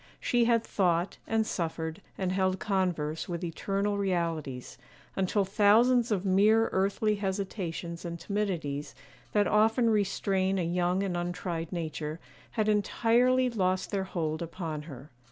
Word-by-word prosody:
She 240 -1 +2
had 230 -1 +3
thought, 175 -3 0
and 225 0 +1
suffered, 165 -1 -3 0.2
and 185 -1 -1
held 185 0 +1
converse 180 -7 -1
with 175 0 -3
eternal 200 +4 -1
realities, 165 -9 -2 0.4
until 195 +1 +1
thousands 225 +5 +4
of 200 -2 0
mere 210 +4 +4
earthly 200 +2 +1
hesitations 190 -4 -4
and 170 -1 -5
timidities, 170 -9 -3 0.4
that 205 -1 +4
often 225 +3 +3
restrain 195 -2 +1
a 180 - 0
young 180 +2 +1
and 190 -3 -2
untried 175 -1 -3
nature, 160 -2 -4 0.3
had 215 -1 0
entirely 240 +4 +3
lost 185 -6 0
their 195 -2 -1
hold 160 -4 -2
upon 165 -2 -4
her. 135 +1 -10
190 Hz, 135 wpm, -29 LUFS, 170-210 Hz, 0.4 s, thousands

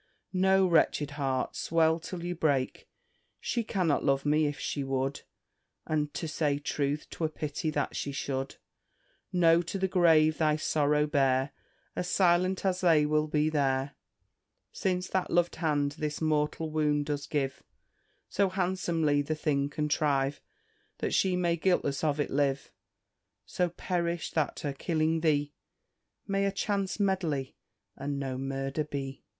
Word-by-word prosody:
No, 190 +1 +4
wretched 155 -4 +2
heart, 135 -3 -2
swell 160 0 +2
till 170 +1 -7
you 175 0 -2
break. 145 -6 -1 0.5
She 235 - -1
cannot 185 -9 0
love 140 -1 +1
me, 150 +1 +3
if 145 0 -3
she 135 +1 -2
would, 135 +1 -2 0.6
And, 150 -1 -1
to 165 - -3
say 150 -2 0
truth, 145 0 -2
'twere 160 -2 -2
pity 155 0 -3
that 145 -2 -2
she 140 - -3
should. 135 -1 -3 0.8
No, 170 -1 +5
to 175 +3 -4
the 190 0 +1
grave 160 -4 +4
thy 155 -2 +3
sorrow 150 -1 +2
bear, 135 -2 +2 0.4
As 180 - -2
silent 185 +1 +2
as 185 -1 +1
they 160 -4 +5
will 155 +1 +1
be 150 0 +1
there; 135 -2 0 0.8
Since 180 -1 -1
that 190 -1 -1
lov'd 175 0 +1
hand 150 -3 +1
this 150 -1 -2
mortal 155 0 0
wound 150 -1 +1
does 145 -1 -3
give, 135 -3 -2 0.7
So 200 -1 +1
handsomely 175 -5 +1
the 155 +2 -2
thing 145 -2 0
contrive 145 -2 0 0.6
That - - -2
she 190 -2 +2
may 175 -1 +1
guiltless 160 -6 +1
of 150 -1 +1
it 145 - -1
live; 140 -1 0 0.7
So 180 -1 0
perish, 170 -1 -2
that 155 -3 -1
her 145 - -2
killing 160 +2 0
thee 145 -2 +1 0.7
May 195 0 0
a 195 - +1
chance 195 0 -2
medley, 170 -9 0 0.4
and 140 0 -3
no 135 -2 -3
murder, 135 +2 -2
be." 135 -2 -6
155 Hz, 145 wpm, -29 LUFS, 145-175 Hz, 0.8 s, No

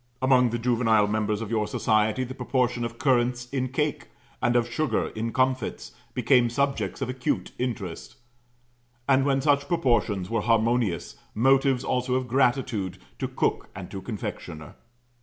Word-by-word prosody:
Among 130 -2 +4
the 120 - -2
juvenile 115 -3 +3
members 105 0 -1
of 110 -1 -5
your 110 -2 0
society 110 +3 +1
the 130 +1 -6
proportion 125 -1 0
of 115 0 -5
currants 125 -4 +1
in 130 -2 -1
cake, 150 +3 -2 0.3
and 120 - +2
of 120 -1 +3
sugar 120 0 -1
in 115 +1 -4
comfits, 130 - -1 0.2
became 125 -3 +4
subjects 135 -3 -1
of 130 - -4
acute 130 -1 -2
interest; 110 -9 -4 0.9
and, 135 -1 +4
when 135 -1 +2
such 140 0 +2
proportions 120 - +1
were 115 +1 -1
harmonious, 115 -4 +1 0.2
motives 135 +2 +3
also 125 0 0
of 130 -1 -1
gratitude 120 -6 +1 0.2
to - - -1
cook - - -1
and 95 -1 -8
to 95 - -6
confectioner. 85 -8 -6
120 Hz, 150 wpm, -26 LUFS, 110-130 Hz, 0.9 s, Among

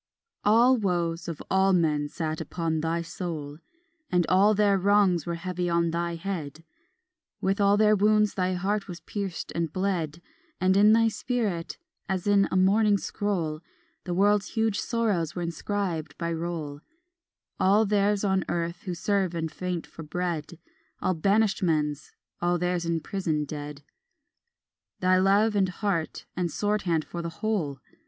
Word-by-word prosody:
II 460 - -65
All 245 +4 +5
woes 175 -5 -1
of 165 -4 -5
all 190 0 +4
men 150 -4 +1
sat 155 -1 -3
upon 165 -2 -2
thy 165 +2 -1
soul 165 -4 -6 0.5
And 180 -1 +3
all 200 +3 +5
their 205 -1 +3
wrongs 195 -3 +3
were 170 - -1
heavy 180 0 -3
on 170 -1 +1
thy 170 0 -2
head; 165 -4 -5 0.8
With 195 +2 0
all 200 0 +4
their 215 0 +5
wounds 210 0 +3
thy 185 -1 0
heart 195 +3 -1
was 175 -2 -7
pierced 200 -4 -5
and 165 -2 -2
bled, 175 -4 -2 0.4
And 185 0 +3
in 210 +2 +6
thy 225 0 +4
spirit 215 -8 -2 0.3
as 190 -2 -1
in 200 -1 +4
a - - -2
mourning 200 +3 +4
scroll 175 -7 -2 0.4
The 175 -2 -2
world's 205 +1 +3
huge 220 -2 +1
sorrows 210 - -1
were 175 - -3
inscribed 170 -1 -3
by 170 -1 -2
roll, 160 -3 -4 0.8
All 205 +4 +4
theirs 205 0 +2
on 190 -2 +2
earth 170 +1 -2
who 180 -2 -3
serve 185 0 0
and 160 -1 -2
faint 180 0 -4
for - - -11
bread, 170 0 -3 0.4
All 185 - +1
banished 200 +5 +2
men's, 150 -4 0 0.3
all 175 0 +2
theirs 175 -1 -1
in 165 -1 0
prison 160 -5 -2
dead, 145 0 -7 1.2
Thy 185 0 +3
love 200 +3 +3
had 195 -2 +2
heart 180 -4 -2
and 175 -1 -1
sword 210 +3 0
hand 160 -2 +1
for 170 - -6
the 170 - -4
whole. 170 -6 -2
180 Hz, 160 wpm, -27 LUFS, 165-200 Hz, 1.2 s, in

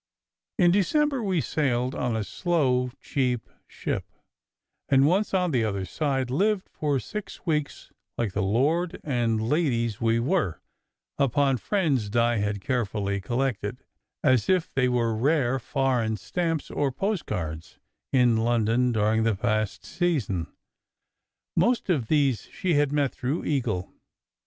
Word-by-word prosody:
In 175 -4 +5
December 275 - +2
we 190 -6 +1
sailed 130 -5 0
on 125 -2 -1
a 110 - -1
slow, 130 - +1
cheap 125 -4 -1 0.2
ship; - - -4 0.8
and 135 0 +5
once 190 +7 +2
on 180 -3 +1
the 125 -5 +2
other 100 -3 -2
side, 135 - -1
lived 195 +7 +1
for 145 -3 0
six 210 +8 -7
weeks, 150 -4 -2 0.3
like 110 -5 -1
the 100 - 0
lord 145 - +1
and 115 -5 0
ladies 120 - 0
we 115 0 +2
were, 135 - 0 0.6
upon 140 0 +2
friends 140 - 0
Di 120 +1 +2
had 105 -1 -1
carefully 100 -4 -1
collected, 120 0 -2 0.4
as 130 - +3
if 185 -3 +1
they 125 -2 +2
were 115 -2 +1
rare 135 +1 +2
foreign 125 -4 0
stamps 165 - -2
or 140 -2 0
postcards, 90 - -3 0.3
in 125 -3 +4
London 115 +2 +2
during 110 0 +2
the 110 -2 +2
past 110 0 -1
season. 135 - -1 1.1
Most 235 -5 +2
of 135 -10 0
these 140 -5 +1
she 180 -2 -1
had 145 -1 +2
met 145 -3 +1
through 135 +6 -2
Eagle. 120 -11 -1
130 Hz, 135 wpm, -26 LUFS, 115-155 Hz, 1.1 s, In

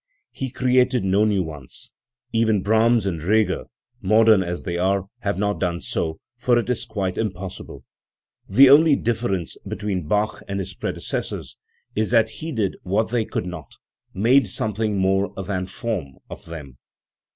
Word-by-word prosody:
He 135 - -4
created 125 -1 +2
no 100 +3 +3
new 100 -3 +2
ones; 75 -5 -9 0.4
even 110 -4 +2
Brahms 110 +1 +3
and 85 -5 -2
Reger, 110 +6 +1 0.4
modern 110 0 +5
as 90 -1 -4
they 85 - -3
are, 95 +2 +1
have 100 -6 -2
not 105 +1 0
done 85 -2 -1
so, 80 -2 -3 0.2
for. 120 0 +2
it 120 - 0
is 120 0 -1
quite 100 -5 -3
impossible. 95 -4 -5 0.7
The 135 +7 +7
only 150 +1 +7
difference 110 -9 -2
between 95 -6 -4
Bach 105 +4 0
and 100 - -3
his 95 0 -4
predecessors - - -4 0.4
is 110 0 0
that 115 -2 +3
he 160 +1 -4
did 110 -8 -1
what 105 +4 0
they 120 -3 +1
could - - -3
not 90 0 -8 0.4
made 120 +5 +3
something 105 +1 -1
more 95 +1 +1
than 95 -1 -3
form 95 - -4 0.2
of - - -9
them. 75 -7 -9
105 Hz, 155 wpm, -23 LUFS, 95-115 Hz, 0.7 s, The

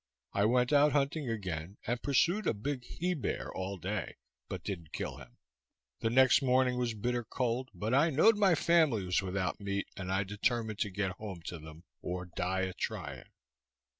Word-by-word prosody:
I 100 - +2
went 125 +4 +3
out 145 +1 +5
hunting 145 -1 0
again, 95 -4 -4
and 120 +1 -1
pursued 170 - +2
a - - +2
big 130 +4 -3
he 180 +2 -2
bear 145 -10 -3
all 95 +1 -4
day, 95 +3 -3 0.3
but - - -5
didn't 85 -6 -6
kill - - -4
him. - - -14 0.6
The 115 - 0
next 130 +4 +5
morning 125 -1 +3
was 120 -2 -1
bitter 120 +3 -1
cold, 125 +2 -2
but 105 +7 -2
I 145 +5 +5
knowed 160 +10 +5
my 200 -4 +4
family 155 - +3
was 90 +2 +2
without 95 -1 -2
meat, 100 0 -2
and 95 -2 -4
I 95 +1 +2
determined 110 +2 -1
to 105 - 0
get 95 0 -1
home 95 -6 -7
to 85 - -6
them, 80 +2 -11 0.2
or 90 +1 -4
die 90 +2 -2
a 95 -1 -2
trying. - - -5
110 Hz, 185 wpm, -32 LUFS, 95-130 Hz, 0.6 s, out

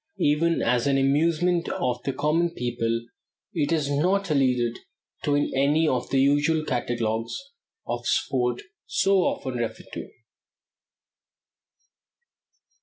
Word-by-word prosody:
Even 165 +3 +2
as 125 +1 +2
an 140 -1 +3
amusement 165 +5 +2
of 125 -1 -1
the 135 - -2
common 160 +5 +1
people 115 -1 -2 0.5
it 150 -5 0
is 155 -4 +1
not 180 +5 +1
alluded 125 -4 +1 0.4
to 145 - +1
in 145 - +1
any 145 +4 +3
of 125 -4 -1
the 135 - +2
usual 145 +3 +3
catalogues 115 -3 -2 0.5
of 120 0 -4
sport 125 -2 0 0.2
so 195 0 +2
often 130 -8 -1
referred 115 -1 -4
to. - - -6
140 Hz, 115 wpm, -25 LUFS, 120-160 Hz, 0.5 s, an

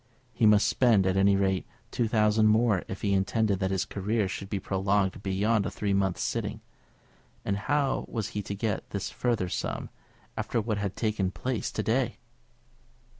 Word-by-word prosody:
He 110 - +3
must 105 0 +5
spend, 115 -7 +3
at 95 0 +1
any 100 +1 +4
rate, 95 -1 0 0.2
two 120 - 0
thousand 110 -1 +3
more 110 -3 +3
if 95 - -7
he 100 -1 +2
intended 100 +1 +1
that 95 -1 0
his 95 -1 0
career 105 +1 -1
should 95 +1 -6
be 100 - -2
prolonged 95 0 0
beyond 100 +3 +1
a - - -2
three 100 -2 -2
months' 95 -2 0
sitting; - - -2 0.9
and 100 - 0
how 140 +6 0
was 110 -3 -3
he 105 - -3
to 100 0 -5
get 105 0 -2
this 100 0 -4
further 115 -7 0
sum 85 - -4 0.4
after 115 - -1
what 105 -1 -1
had 100 -1 -3
taken 105 -4 0
place 125 +4 -3
to 110 - -2
day? 120 +2 0
100 Hz, 175 wpm, -28 LUFS, 95-110 Hz, 0.9 s, must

